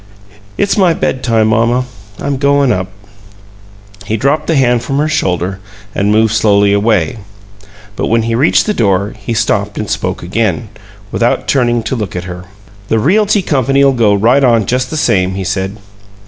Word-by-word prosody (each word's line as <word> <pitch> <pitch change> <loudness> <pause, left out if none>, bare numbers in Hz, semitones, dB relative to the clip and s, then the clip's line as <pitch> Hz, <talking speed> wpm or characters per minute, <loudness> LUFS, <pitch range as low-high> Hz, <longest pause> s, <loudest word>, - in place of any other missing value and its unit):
"It's 200 - +1
my 175 -4 +3
bedtime, 115 -4 0
mamma; 115 +3 +1 0.3
I'm 140 -1 -2
goin' 140 -1 +2
up." 95 -4 -1 1.2
He 110 - -1
dropped 145 +6 0
the 165 - +1
hand 125 -3 +2
from 135 - -3
her 150 +2 +1
shoulder 95 - -1 0.3
and 100 +1 0
moved 110 0 +2
slowly 100 -2 +3
away, 105 -1 +1 0.8
but - - -2
when 115 0 +1
he 115 0 -2
reached 130 +8 +3
the 210 - 0
door 100 - 0
he 110 +2 -5
stopped 105 -2 -1
and 105 - -3
spoke - - -3
again, - - -1 0.4
without - - 0
turning 120 -3 +1
to 110 +4 -2
look 105 -6 -4
at 90 - -3
her. 90 0 -8 0.4
"The 110 - +1
Realty 205 - +2
Company'll 135 -2 +2
go 110 -5 +2
right 120 +7 +3
on 115 -4 +3
just 125 +4 -1
the 155 - -4
same," 95 -9 +1
he 95 - -3
said. 95 +2 -3
115 Hz, 170 wpm, -13 LUFS, 100-135 Hz, 1.2 s, my